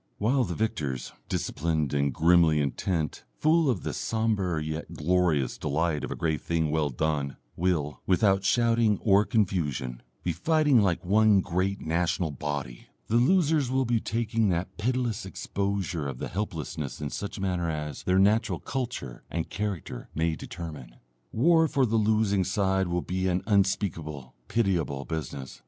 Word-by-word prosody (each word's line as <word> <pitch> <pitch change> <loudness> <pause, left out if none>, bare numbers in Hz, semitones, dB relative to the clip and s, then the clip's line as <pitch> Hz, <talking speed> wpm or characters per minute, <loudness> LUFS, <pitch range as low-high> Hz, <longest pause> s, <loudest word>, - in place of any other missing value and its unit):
While 125 +5 +2
the 85 -3 -4
victors, 75 - -2 0.2
disciplined 80 -2 -1
and 70 -1 +1
grimly 80 +1 +4
intent, 75 +2 -1
full 160 -1 +3
of 115 -8 0
the - - -3
sombre 105 -7 0
yet 80 +2 -5
glorious 80 -3 +1
delight 75 +1 0
of - - -3
a - - -3
grave 80 -2 -1
thing 80 -2 0
well 75 -1 +1
done, 70 0 -1 0.2
will, 80 -4 -1
without 95 0 +3
shouting 115 0 +3
or 100 0 +5
confusion, 80 - -1 0.2
be 90 - 0
fighting 150 - +3
like 95 -3 0
one 105 +1 +5
great 95 +2 -1
national 85 0 0
body, 70 -3 -5 0.2
the 115 - +3
losers 150 0 +3
will 130 0 +1
be 120 -1 +1
taking 115 -1 0
that 90 0 -2
pitiless 120 0 -1
exposure 95 -4 -2
of 65 -2 -6
helplessness 80 -7 -4
in 75 -1 -4
such 100 - -5
a - - -6
manner 90 -3 0
as 75 -2 -4
their 95 0 +1
natural 105 +4 +3
culture 120 - -4
and 85 -1 -3
character 100 -11 -4
may 80 0 +1
determine. 75 -8 -8 0.4
War 160 +6 +4
for 135 -3 +2
the 115 -1 +1
losing 105 -2 +2
side 95 0 +1
will 85 0 -1
be 95 +1 -1
an 90 0 0
unspeakable 85 - 0
pitiable 85 -11 0
business. 70 -6 -5
90 Hz, 150 wpm, -27 LUFS, 80-110 Hz, 0.4 s, or